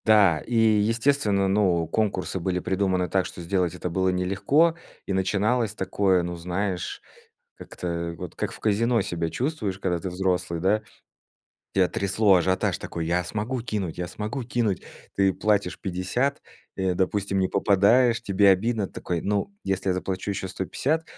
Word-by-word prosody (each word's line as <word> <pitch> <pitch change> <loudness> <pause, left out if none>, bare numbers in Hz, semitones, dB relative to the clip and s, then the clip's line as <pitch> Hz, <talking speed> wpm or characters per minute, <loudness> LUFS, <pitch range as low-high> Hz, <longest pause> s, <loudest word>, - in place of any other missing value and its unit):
Да, 100 -7 +5
и, 120 - -5
естественно, 110 -1 +3
ну, 95 -4 +2
конкурсы 95 0 -1
были 90 +1 -1
придуманы 95 -1 0
так, 95 0 0
что - - -11
сделать 90 0 -1
это 90 - -4
было 95 +1 +1
нелегко, 100 - +2 0.3
и 100 - -2
начиналось 105 +4 +1
такое, 95 -2 +1
ну 90 0 -4
знаешь, 90 +2 -3 0.5
как-то 85 -1 -5
вот 90 -2 -8
как - - -3
в - - -10
казино 115 +2 +2
себя 85 -3 -2
чувствуешь, 120 -9 -2
когда 90 -3 0
ты 95 +2 -4
взрослый, 90 -2 -1
да? 100 +5 +2 0.9
Тебя 95 -2 +4
трясло, 100 0 +3
ажиотаж 95 +1 +1
такой: 85 - -5
я 90 +2 +1
смогу 110 +7 -3
кинуть, 105 -8 -3
я 90 - -2
смогу 110 +8 -4
кинуть. 115 -6 -1 0.3
Ты 95 -1 +3
платишь 105 -4 0
50, 95 +10 -1 0.4
э, 95 -1 0
допустим, 95 +1 0
не 95 - +1
попадаешь- 105 +5 +3
тебе 100 +1 +3
обидно. 105 +2 +2
Ты - - -18
такой: 85 -2 -3
"Ну, 105 - -1
если 95 0 0
заплачу 95 +2 -2
еще 95 -1 -3
150 135 - -1
95 Hz, 155 wpm, -25 LUFS, 90-110 Hz, 0.9 s, Да